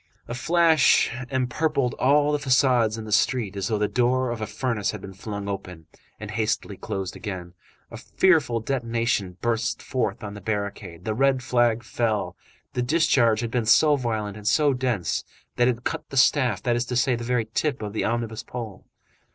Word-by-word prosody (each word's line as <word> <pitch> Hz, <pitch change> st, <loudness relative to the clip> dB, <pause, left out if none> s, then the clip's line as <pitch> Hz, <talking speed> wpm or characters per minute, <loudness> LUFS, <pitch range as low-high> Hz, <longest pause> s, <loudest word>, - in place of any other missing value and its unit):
A -, -, -5 dB
flash 160 Hz, +3 st, +4 dB, 0.2 s
empurpled 130 Hz, +1 st, 0 dB
all 145 Hz, +2 st, +4 dB
the 150 Hz, -, 0 dB
façades 125 Hz, -5 st, +3 dB
in 110 Hz, -, -6 dB
the 105 Hz, -, -8 dB
street 105 Hz, -1 st, +1 dB
as 100 Hz, -1 st, -2 dB
though 110 Hz, -, 0 dB
the 105 Hz, 0 st, +1 dB
door 125 Hz, +1 st, +1 dB
of 115 Hz, -2 st, -5 dB
a 110 Hz, -, -2 dB
furnace 110 Hz, -1 st, -2 dB
had 105 Hz, -, -4 dB
been 95 Hz, -, -9 dB
flung 100 Hz, +1 st, -6 dB
open, 90 Hz, -5 st, -6 dB, 0.3 s
and 105 Hz, -1 st, -7 dB
hastily 110 Hz, -2 st, -1 dB
closed 95 Hz, 0 st, -5 dB
again. 90 Hz, -4 st, -6 dB, 0.4 s
A -, -, -7 dB
fearful 150 Hz, -11 st, +2 dB
detonation 115 Hz, -6 st, -1 dB
burst 115 Hz, -1 st, 0 dB
forth 110 Hz, -7 st, -2 dB
on 100 Hz, -1 st, -6 dB
the 105 Hz, -, -9 dB
barricade. 100 Hz, -4 st, -4 dB
The 110 Hz, -, -1 dB
red 130 Hz, +2 st, +2 dB
flag 120 Hz, -1 st, +2 dB
fell. 105 Hz, -6 st, -1 dB, 0.4 s
The 125 Hz, -, -1 dB
discharge 120 Hz, -5 st, +3 dB
had 115 Hz, -1 st, -3 dB
been 120 Hz, -2 st, -1 dB
so 150 Hz, +6 st, +6 dB
violent 110 Hz, -6 st, -3 dB
and 105 Hz, 0 st, -7 dB
so 145 Hz, +2 st, +3 dB
dense 125 Hz, -9 st, -1 dB, 0.3 s
that 120 Hz, 0 st, +4 dB
it 125 Hz, -, +2 dB
had 120 Hz, -, -18 dB
cut -, -, -4 dB
the 135 Hz, -, -5 dB
staff, 125 Hz, -5 st, +3 dB
that 120 Hz, -1 st, +1 dB
is 120 Hz, +1 st, 0 dB
to 125 Hz, -, -3 dB
say, 125 Hz, +1 st, +2 dB
the 120 Hz, -, -5 dB
very 120 Hz, -1 st, 0 dB
tip 140 Hz, -7 st, -1 dB
of 105 Hz, -1 st, -5 dB
the 110 Hz, -, -1 dB
omnibus 115 Hz, -1 st, -2 dB
pole. 110 Hz, -6 st, -8 dB
115 Hz, 190 wpm, -24 LUFS, 105-130 Hz, 0.4 s, so